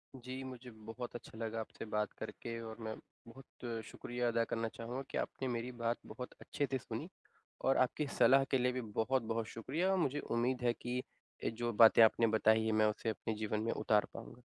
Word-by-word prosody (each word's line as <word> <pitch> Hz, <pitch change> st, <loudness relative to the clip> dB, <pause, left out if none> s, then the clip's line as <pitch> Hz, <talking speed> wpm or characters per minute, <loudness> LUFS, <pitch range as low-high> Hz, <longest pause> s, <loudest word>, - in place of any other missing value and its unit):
जी, 130 Hz, +1 st, -6 dB
मुझे 125 Hz, -1 st, -8 dB
बहुत 115 Hz, +3 st, -7 dB
अच्छा 115 Hz, -1 st, -9 dB
लगा 115 Hz, 0 st, -3 dB
आपसे 110 Hz, -, -6 dB
बात 105 Hz, -1 st, -1 dB
करके, 115 Hz, 0 st, -5 dB
और 110 Hz, -1 st, -7 dB
मैं 110 Hz, -1 st, -4 dB, 0.3 s
बहुत 120 Hz, -2 st, -7 dB
शुक्रिया 120 Hz, 0 st, -3 dB
अदा 115 Hz, 0 st, +2 dB
करना 115 Hz, 0 st, -1 dB
चाहूँगा 115 Hz, +3 st, -5 dB
कि -, -, -3 dB
आपने 135 Hz, -, -2 dB
मेरी 120 Hz, 0 st, -2 dB
बात 115 Hz, +1 st, +1 dB
बहुत 125 Hz, -1 st, -7 dB
अच्छे 145 Hz, -, -1 dB
से 135 Hz, -, +2 dB
सुनी, 125 Hz, -, -5 dB, 0.5 s
और 135 Hz, -, +3 dB
आपकी 135 Hz, +4 st, +2 dB
सलाह 135 Hz, +3 st, +7 dB
के 135 Hz, -, +5 dB
लिए 125 Hz, 0 st, +2 dB
भी 130 Hz, 0 st, -2 dB
बहुत-बहुत 115 Hz, 0 st, 0 dB
शुक्रिया। 150 Hz, -, -1 dB
और 190 Hz, -, +3 dB
मुझे 145 Hz, -4 st, +1 dB
उम्मीद 125 Hz, +2 st, 0 dB
है 120 Hz, -1 st, +3 dB
कि 120 Hz, +1 st, -4 dB, 0.5 s
ये -, -, +1 dB
जो 120 Hz, +1 st, -2 dB
बातें 115 Hz, +1 st, +8 dB
आपने 115 Hz, +1 st, +5 dB
बताई 110 Hz, 0 st, +4 dB
हैं, 110 Hz, -, +2 dB
मैं 110 Hz, 0 st, +4 dB
उसे 105 Hz, +1 st, 0 dB
अपने 110 Hz, +1 st, -2 dB
जीवन 105 Hz, 0 st, -1 dB
में 115 Hz, -, 0 dB
उतार 105 Hz, -1 st, +3 dB
पाऊँगा। 125 Hz, -, -9 dB
115 Hz, 200 wpm, -36 LUFS, 110-125 Hz, 0.5 s, बातें